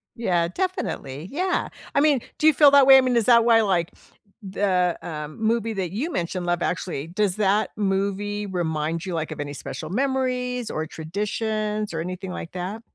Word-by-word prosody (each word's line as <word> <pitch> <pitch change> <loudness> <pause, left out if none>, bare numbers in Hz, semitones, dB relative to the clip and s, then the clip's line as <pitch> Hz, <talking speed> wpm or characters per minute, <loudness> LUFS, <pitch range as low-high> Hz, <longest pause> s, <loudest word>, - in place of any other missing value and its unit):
Yeah, 175 -7 +1
definitely, 170 - -4
yeah. 365 +5 -1 0.2
I 280 - +3
mean, 285 -3 +3 0.2
do 310 - +3
you 315 - +7
feel 290 0 +7
that 280 -1 +6
way? 270 - +10
I 265 - +6
mean, 255 -1 +1
is 225 - +2
that 235 -2 +6
why, 230 -1 +5
like, 180 -5 0 0.5
the, 190 -3 0
um, 155 +1 -7
movie 225 0 +1
that 185 -4 -3
you 265 - -3
mentioned- 175 - -3
Love 175 0 0
Actually- 165 -5 -2
does 185 +1 0
that 210 +1 +2
movie 200 +1 -1
remind 165 -3 -2
you, 185 - -4
like, 160 -2 -3
of - - -7
any 145 0 -5
special 155 +2 -7
memories, 250 +1 -1
or 155 - -3
traditions, 210 +4 -3
or 160 - -2
anything 185 +2 -5
like 170 - -7
that? 185 +5 -5
200 Hz, 185 wpm, -24 LUFS, 175-235 Hz, 0.5 s, way